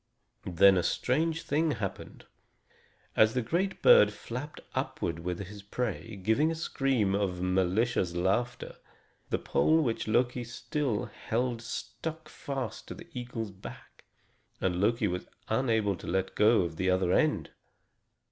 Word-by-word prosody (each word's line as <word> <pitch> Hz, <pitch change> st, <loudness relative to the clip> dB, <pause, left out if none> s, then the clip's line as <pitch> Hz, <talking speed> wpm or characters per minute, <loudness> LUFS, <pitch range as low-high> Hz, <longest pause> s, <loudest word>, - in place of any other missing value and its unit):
Then 95 Hz, +2 st, +6 dB
a -, -, +3 dB
strange 160 Hz, -, 0 dB
thing 155 Hz, +1 st, +1 dB
happened. 100 Hz, -7 st, -6 dB, 0.9 s
As 110 Hz, +1 st, +4 dB
the 125 Hz, -, +1 dB
great 185 Hz, +10 st, -1 dB
bird -, -, +8 dB
flapped 130 Hz, +6 st, -7 dB
upward 85 Hz, -1 st, -2 dB
with 90 Hz, +1 st, -3 dB
his 100 Hz, +2 st, -10 dB
prey, 105 Hz, -2 st, -4 dB
giving 110 Hz, +11 st, +2 dB
a 165 Hz, -, -1 dB
scream 135 Hz, -10 st, 0 dB
of 95 Hz, -3 st, 0 dB
malicious 95 Hz, +1 st, +1 dB
laughter, 100 Hz, +8 st, -1 dB, 0.5 s
the -, -, +1 dB
pole 160 Hz, +1 st, +2 dB
which 115 Hz, -5 st, -1 dB
Loki 120 Hz, +2 st, +1 dB
still 120 Hz, -1 st, -2 dB
held 115 Hz, +3 st, -2 dB
stuck 160 Hz, +7 st, -6 dB
fast 135 Hz, -2 st, -5 dB
to -, -, -7 dB
the -, -, -12 dB
eagle's 120 Hz, -4 st, -5 dB
back, 95 Hz, 0 st, -12 dB, 0.6 s
and 90 Hz, -1 st, 0 dB
Loki 115 Hz, +1 st, +2 dB
was 90 Hz, -1 st, -3 dB, 0.2 s
unable 110 Hz, -4 st, +1 dB
to -, -, -10 dB
let 95 Hz, +1 st, -1 dB
go 110 Hz, +1 st, +5 dB
of 85 Hz, -2 st, -3 dB
the 95 Hz, +1 st, +1 dB
other 90 Hz, -1 st, +2 dB
end. -, -, +1 dB
110 Hz, 140 wpm, -30 LUFS, 95-130 Hz, 0.9 s, bird